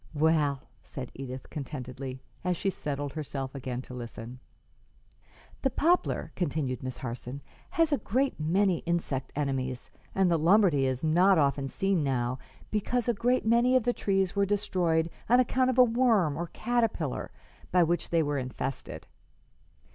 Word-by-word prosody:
"Well," 150 -3 +2 0.2
said 130 -3 -7
Edith, 130 -1 -7
contentedly, 130 -2 -6 0.2
as 180 -1 0
she 195 - 0
settled 145 -4 -3
herself 140 -3 -4
again 130 -2 -4
to 125 - -11
listen. 120 0 -7 1.2
"The 270 - +2
poplar," 335 +7 +1
continued 145 -7 -1
Miss 130 -1 -5
Harson, 125 +2 -6 0.3
"has 325 -2 +2
a 280 - +2
great 255 +4 0
many 180 +3 +2
insect 165 -6 -1
enemies, 130 -3 -2 0.2
and 190 -2 +3
the 165 - +3
Lombardy 165 -5 +4
is 130 +1 -2
not 180 +4 +5
often 140 -2 +2
seen 195 +2 0
now, 130 -2 -1 0.3
because 230 +3 0
a 240 - +3
great 245 +3 +1
many 235 +3 +4
of 255 - +4
these 245 +1 +1
trees 195 -3 0
were 200 - +3
destroyed 180 -5 +1 0.2
on 245 +2 +6
account 255 +1 +2
of 260 - 0
a 255 - +9
worm, 225 - +3
or 170 +3 -3
caterpillar, 225 - -1 0.4
by 180 -1 +5
which 170 +1 0
they 165 -1 +3
were 145 -1 -1
infested. 130 +1 -5
160 Hz, 155 wpm, -29 LUFS, 135-205 Hz, 1.2 s, a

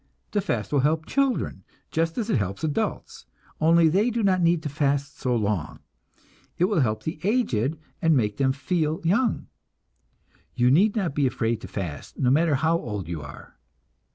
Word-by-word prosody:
The 205 - +1
fast 120 - -3
will 145 - +4
help 155 +3 +1
children, 275 -2 0 0.3
just 165 0 -1
as 225 -3 -1
it - - +3
helps 100 - -4
adults, 145 - -3 0.3
only 165 +1 +5
they 195 +9 +2
do 235 -1 -1
not 185 -2 +3
need 170 -1 +2
to - - -2
fast 140 0 -1
so 125 -1 0
long. 100 -7 -1 0.8
It 175 - +3
will 200 -3 +1
help 110 -6 0
the 155 0 -4
aged 165 - +1 0.2
and 160 -3 +4
make 105 -4 0
them 135 -1 +2
feel 155 +3 -1
young. 210 +8 +1 1.1
(You 125 +1 +3
need 200 - +4
not 190 -9 -1
be 140 -2 +2
afraid 115 -2 -1
to - - -8
fast, 85 -8 -6
no 125 -1 +2
matter 155 +1 +3
how 160 +4 +1
old 105 - -5
you 85 -3 -4
are.) 70 -2 -12
150 Hz, 180 wpm, -25 LUFS, 120-175 Hz, 1.1 s, only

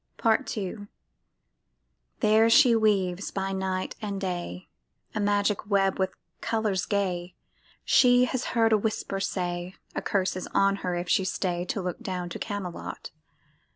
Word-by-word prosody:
PART 225 -1 +1
II 205 +1 -4 1.3
There 220 0 +5
she 245 -1 +6
weaves 200 -4 +1
by 195 0 -3
night 190 -1 -2
and 200 -2 -3
day 175 - -4 0.5
A - - -2
magic 205 0 +1
web 195 -2 +2
with 190 0 +2 0.3
colors 215 -5 0
gay. 185 -4 -1 0.5
She 250 -1 +5
has 255 0 -2
heard 225 -1 +4
a 215 - +4
whisper 205 -2 -2
say, 180 -1 -3 0.2
A - - -2
curse 190 -2 0
is 185 - -5
on 195 0 +4
her 180 -2 -2
if 175 +1 -3
she 190 - +3
stay 180 -2 -1
To 195 +1 -3
look 180 +3 -3
down 185 -5 -4
to - - -6
Camelot. 200 -5 -5
195 Hz, 150 wpm, -27 LUFS, 185-215 Hz, 1.3 s, she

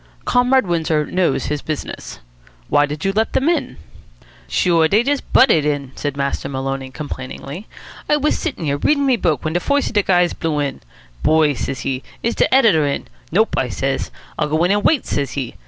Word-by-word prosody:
"Comrade 250 +1 +3
Windsor 160 -3 0
knows 180 -2 0
his 150 -1 -2
business. 155 -2 -6 0.5
Why 145 0 +4
did 150 +5 -5
you 195 - +1
let 220 +2 0
them 270 - +1
in?" 340 - 0 0.7
"Sure, 170 -3 +3
dey 210 +7 +3
just 280 +1 -2
butted 220 - +5
in," 145 -3 -2
said 145 -1 -4
Master 140 0 -2
Maloney 135 0 -3
complainingly. 140 - -7 0.4
"I 300 - +4
was 295 +1 +1
sittin' 285 - -4
here, 140 -1 0
readin' 285 - +2
me 265 -2 +4
book, 170 -9 0
when 155 - -1
de 175 - +2
foist 285 +7 +1
of - - -10
de 205 - +4
guys 180 -3 +2
blew 160 -2 -2
in. 140 -2 -2 0.4
'Boy,' 155 -2 +3
says 135 +1 -4
he, 130 -1 -2 0.2
'is 235 - +1
de - - +1
editor 210 - +4
in?' 140 - -3 0.2
'Nope,' - - +2
I - - -1
says. - - -2 0.3
'I'll - - 0
go 155 +2 +1
in 180 - +3
an' 205 +1 +2
wait,' 300 +5 +2
says 140 -3 -2
he. 130 -4 -4
160 Hz, 200 wpm, -19 LUFS, 145-220 Hz, 0.7 s, butted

